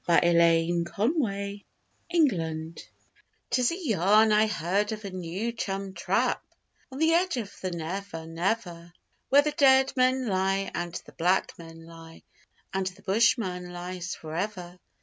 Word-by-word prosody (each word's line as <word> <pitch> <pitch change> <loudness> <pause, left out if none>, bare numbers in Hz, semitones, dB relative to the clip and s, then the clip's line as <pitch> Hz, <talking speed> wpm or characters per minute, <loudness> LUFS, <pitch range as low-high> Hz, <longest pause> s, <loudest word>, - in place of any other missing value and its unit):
A 170 - +3 0.2
LITTLE 170 - +2
MISTAKE 200 - -3 0.6
'Tis 245 +2 +2
a 345 +1 -6
yarn 215 +1 +4
I 215 +1 +4
heard 205 +1 -1
of 215 -1 -6
a 195 - -5
new 185 +5 -3
chum 195 -4 -4
'trap' - - 0 0.5
On 260 - -8
the 320 +2 +3
edge 350 -3 +2
of 210 -4 -5
the 185 - -2
Never 170 0 -5
Never, 175 0 -3 0.4
Where 285 +2 +6
the 300 - 0
dead 265 -2 +4
men 255 0 +2
lie 195 -1 0
and 175 0 -4
the - - -14
black 180 +3 +1
men 165 -1 -11
lie, 165 0 -13 0.5
And 190 -1 -1
the 190 +2 -8
bushman 195 -4 +1
lies 180 0 -5
for 155 -1 -9
ever. 180 -2 -4
195 Hz, 145 wpm, -27 LUFS, 170-230 Hz, 0.6 s, Where